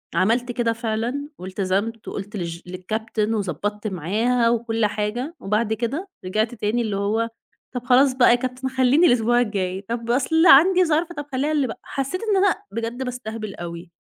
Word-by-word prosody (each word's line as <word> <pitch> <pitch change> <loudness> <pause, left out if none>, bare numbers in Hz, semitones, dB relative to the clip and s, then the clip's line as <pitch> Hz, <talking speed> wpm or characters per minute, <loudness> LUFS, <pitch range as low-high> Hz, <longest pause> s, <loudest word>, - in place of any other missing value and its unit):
عملت 235 +7 +2
كده 235 -1 0
فعلًا 235 +5 -3
والتزَمت، 195 +4 -2
وقُلت 205 +1 -6
للج 170 -1 -4
للcaptain، 215 +4 -2
وضبَطت 205 +2 -3
معاها 220 +7 +1
وكل 225 -1 0
حاجة. 220 - -2
وبعد 215 +2 0
كده 270 - -3 0.2
رجَعت 215 +5 0
تاني، 215 +3 0
اللي 210 -3 -2
هو: 220 +3 0 0.5
"طَب 245 - -3
خلاص 260 +1 +5
بقى 250 -2 +6
يا - - +6
captain، 255 +1 -3
خلِّيني 270 +7 +5
الأسبوع 240 0 +3
الجاي، 190 -4 -2
طب 235 0 -2
أصل 320 +7 +3
عندي 360 +6 +7
ظرف، 325 +2 +1
طَب 290 -2 -6
خلِّيها 280 +4 0
اللي 285 -4 +1
ب" - - -4
حسِّيت 275 +8 -3 0.2
أنا 390 -1 +4 0.2
بجد 230 +3 -3
باستهبَل 225 -4 -5
أوي، 170 0 -8
230 Hz, 160 wpm, -23 LUFS, 210-255 Hz, 0.5 s, عندي